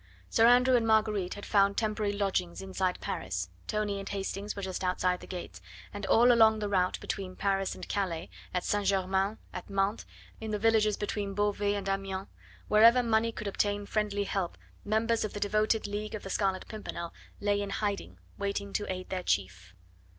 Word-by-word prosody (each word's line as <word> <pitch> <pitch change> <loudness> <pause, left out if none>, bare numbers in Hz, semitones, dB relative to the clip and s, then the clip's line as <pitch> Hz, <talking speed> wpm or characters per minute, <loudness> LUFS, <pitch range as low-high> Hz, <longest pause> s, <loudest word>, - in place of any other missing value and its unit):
Sir 225 - +6
Andrew 250 +1 +6
and 230 -2 +2
Marguerite 215 -4 +2
had 205 - -8
found 200 -1 +3
temporary 215 -2 0
lodgings 195 -4 -1
inside 190 -1 -1
Paris, 90 -1 -3 0.2
Tony 210 -2 -1
and 195 - -6
Hastings 200 +1 -3
were 200 - -5
just 190 0 -3
outside 180 0 +1
the - - -11
gates, 180 -2 -7 0.3
and 205 -1 -5
all 240 +4 +6
along 220 -2 +6
the 210 -1 -2
route 185 -2 +1
between 185 -2 -4
Paris 195 -1 0
and - - -8
Calais, 180 -5 -2 0.2
at 180 -1 -1
St. 205 -1 0
Germain, 195 +2 +1 0.2
at - - -7
Mantes, 195 +2 0 0.3
in 220 - -5
the 210 - 0
villages 215 -1 +3
between 205 -1 -3
Beauvais 205 0 +1
and 200 -1 -4
Amiens, 195 0 -2 0.4
wherever 230 +4 +6
money 230 0 +2
could 215 - -7
obtain 205 +1 0
friendly 205 -1 0
help, 195 -3 -2 0.3
members 225 +2 +1
of 215 - -3
the 205 - -4
devoted 215 +2 +1
League 210 +1 -4
of 210 - -7
the 195 - -6
Scarlet 190 -1 0
Pimpernel 170 -6 -6 0.3
lay 205 0 +1
in 200 - -3
hiding, 200 0 -2 0.2
waiting 200 0 -2
to 205 - -1
aid 185 0 -5
their 185 -1 -2
chief. 95 - -2
200 Hz, 185 wpm, -30 LUFS, 190-215 Hz, 0.4 s, Sir